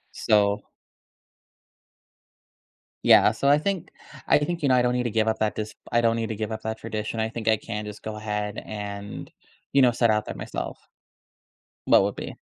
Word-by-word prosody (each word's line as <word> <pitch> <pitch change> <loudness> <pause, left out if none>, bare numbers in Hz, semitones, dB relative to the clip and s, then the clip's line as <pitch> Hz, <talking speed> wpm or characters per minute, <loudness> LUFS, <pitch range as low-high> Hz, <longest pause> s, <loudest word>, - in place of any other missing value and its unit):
So 100 -1 +2 2.4
Yeah, - - +7
so 130 +5 -2
I 145 - +6
think 190 +1 -2 0.4
I - - +6
think, 165 +2 -3
you 140 - +3
know, 130 - +5
I 125 - +4
don't 125 0 +1
need 125 0 0
to 120 - -2
give 110 0 +1
up 110 - 0
that 110 -1 0
dis 110 0 -5 0.2
I 120 - +3
don't 115 -1 +3
need 115 -1 -2
to 110 - -3
give 110 +1 -4
up 110 - -4
that 110 0 -3
tradition. 110 0 -4
I 110 - 0
think 115 0 -7
I 110 - +5
can 105 -1 -5
just 105 0 -8
go 110 0 -5
ahead 105 -1 -3
and, 100 -1 -6 0.4
you 140 - +5
know, 125 -2 +6
set 115 0 +2
out 105 -1 +2
there - - -6
myself. - - -6 1.0
What - - +6
would - - -1
be? - - -6
110 Hz, 200 wpm, -25 LUFS, 105-120 Hz, 2.4 s, Yeah